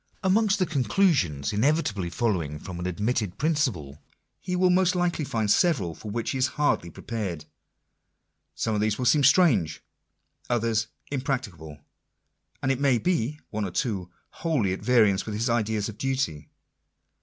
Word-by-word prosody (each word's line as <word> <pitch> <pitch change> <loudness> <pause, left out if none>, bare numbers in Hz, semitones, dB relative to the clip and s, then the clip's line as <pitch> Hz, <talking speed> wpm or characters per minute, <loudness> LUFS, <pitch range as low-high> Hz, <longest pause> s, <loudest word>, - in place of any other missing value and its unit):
Amongst 200 +2 +3
the 185 - +1
conclusions 135 - +1
inevitably 105 - +1
following 85 -8 -1
from 85 +3 -8
an 90 - -3
admitted 105 +1 -1
principle, 120 - -1 0.4
he 180 -1 -3
will 180 0 +3
most 185 0 +3
likely 175 -3 0
find 110 -6 -1
several 110 - +2
for 105 +7 -9
which 115 +2 -2
he 135 - -3
is 130 - +3
hardly 145 -12 +1
prepared. 90 -5 -5 1.1
Some 110 - -1
of 105 - 0
these 105 0 +1
will 125 - -2
seem 140 +4 +4
strange; 135 - +4 0.7
others 115 -2 +1 0.2
impracticable; 125 - -3 0.9
and, 135 - +2
it 135 - -1
may 140 -3 +3
be 150 -2 0
— - - -49
one 105 0 -2
or 100 - -2
two 90 -1 -2 0.2
wholly 135 - 0
at - - -5
variance 110 -6 +3
with 105 - -3
his 115 +3 0
ideas 110 -3 0
of 110 -1 -9
duty. 130 - -2
115 Hz, 155 wpm, -26 LUFS, 95-145 Hz, 1.1 s, seem